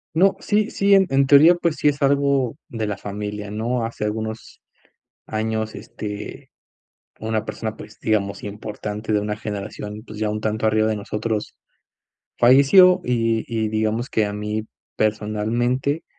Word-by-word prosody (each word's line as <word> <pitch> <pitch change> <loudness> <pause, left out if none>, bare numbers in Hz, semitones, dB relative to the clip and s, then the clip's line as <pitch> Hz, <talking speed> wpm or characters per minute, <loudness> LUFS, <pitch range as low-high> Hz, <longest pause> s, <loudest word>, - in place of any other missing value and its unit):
No, 190 +4 +4
sí 210 +1 +1
sí, 200 0 +3
en 195 -1 +5
en 135 0 +3
teoría, 150 +5 +8
pues, 170 -2 -1
sí - - -2
es 145 0 -1
algo 140 -2 +2
de 110 -2 -3
la 100 - -2
familia, 105 0 -5
¿no? 115 +3 -1
Hace 115 -2 -4
algunos 110 +1 -5 0.7
años, 110 0 -2
este, 105 -1 -7 0.7
una 110 -1 -1
persona, 110 0 -5
pues 110 - -12
digamos, 100 -3 -1
importante 105 +1 -5
de 105 - +3
una 105 0 -2
generación, 105 0 -6
pues, 105 -1 -9
ya 110 -1 0
un 105 - -2
tanto 110 +1 -1
arriba 110 0 +3
de 110 - 0
nosotros 105 +1 -3 0.9
falleció, 140 +9 +7
y 115 -2 +1
y 110 -2 -1
digamos 110 +3 -1
que 110 - +1
a 105 - -3
mí 105 +1 -3 0.3
personalmente 115 +7 0
110 Hz, 150 wpm, -22 LUFS, 105-130 Hz, 0.9 s, teoría